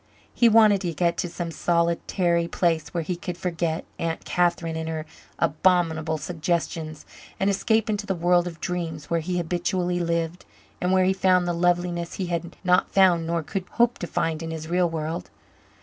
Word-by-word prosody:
He 235 - +5
wanted 215 -3 +6
to 170 -4 -3
get 170 +1 +1
to 175 - -2
some 170 0 -5
solitary 170 +1 +1
place 165 -3 0
where 170 -2 -2
he 180 +3 -2
could 175 0 -6
forget 170 -2 -2
Aunt 165 -1 -3
Catherine 170 -2 0
and 160 0 -3
her 160 -1 -4 0.3
abominable 160 -1 +2
suggestions 160 -1 -3 0.3
and 195 +1 +2
escape 220 +2 +1
into 210 -1 -2
the 190 - 0
world 175 +1 +3
of 165 -2 -7
dreams 165 -4 -4
where 170 - +2
he 180 +3 -2
habitually 175 +1 -1
lived 170 0 -1 0.4
and 180 - +1
where 185 0 +4
he 190 - +3
found 185 -2 +3
the 175 - 0
loveliness 175 0 0
he 190 - -2
had 170 0 -3
not 180 -1 +3
found 180 -4 +4
nor 170 -1 -1
could 190 +4 -4
hope 240 0 +2
to 175 - -4
find 160 -1 -1
in 165 - -4
his 160 -1 -5
real 175 +1 +2
world. 160 +1 -4
175 Hz, 180 wpm, -25 LUFS, 165-180 Hz, 0.4 s, wanted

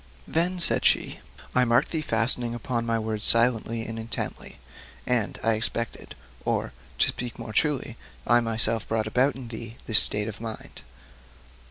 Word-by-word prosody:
Then 175 +3 -1
said 170 - +4
she: - - +1 0.3
'I 125 0 +2
marked 115 0 +1
thee 160 - -3
fastening 120 -2 +3
upon 120 -1 -4
my 115 0 -1
words 110 -1 -4
silently 115 -1 +4
and 115 0 -7
intently, 115 0 -5 0.5
and 120 -4 -2
I 115 - +2
expected, 115 +1 -3 0.3
or - - -3 0.2
to - - +2
speak 120 -1 -7
more 115 -2 -9
truly 135 -3 -2 0.3
I 120 0 +4
myself 115 -1 -1
brought 110 -1 -2
about 125 +5 0
in 125 -3 -10
thee, 115 0 -9
this 110 - +7
state 105 0 +3
of 110 -1 -8
mind. 115 -1 -8
115 Hz, 160 wpm, -24 LUFS, 110-125 Hz, 0.5 s, this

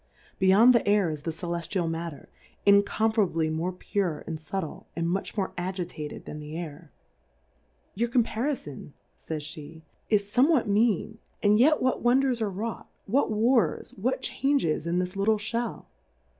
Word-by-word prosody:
Be 190 - +2
yond 220 +7 +7
the 235 - +2
Air 205 -5 +3
is 150 -2 -6
the 165 - -3
Celeftial 170 +1 -3
Matter, 165 -2 -5 0.4
incomparably 200 -4 +3
more 165 +3 -1
pure 180 -3 -2
and 160 -2 -5
fubtle, 160 +1 -5
and 170 0 -1
much 190 +5 -2
more 195 -2 -1
agitated 175 -4 -5
than 150 - -7
the 150 +1 -7
Air., 160 -1 -8 1.0
Your 235 +4 -1
Compariibn, 230 - -2 0.2
fa)'sf])e^ 155 0 -7 0.3
is 210 -2 +3
fome 245 +8 +3
what 295 -10 +3
mean, 220 +1 +1 0.2
and 210 +1 +5
yet 300 +4 +4
what 255 - +1
Wonders 250 0 +2
are 215 - +1
wrought, 210 +3 -5 0.2
what 255 +8 +1
Wars, 220 - +2
what 245 +7 -2
Changes 270 - 0
in 170 +1 0
this 180 +1 -2
little 210 +2 +2
Shell 225 +2 -3
195 Hz, 150 wpm, -27 LUFS, 165-225 Hz, 1.0 s, yond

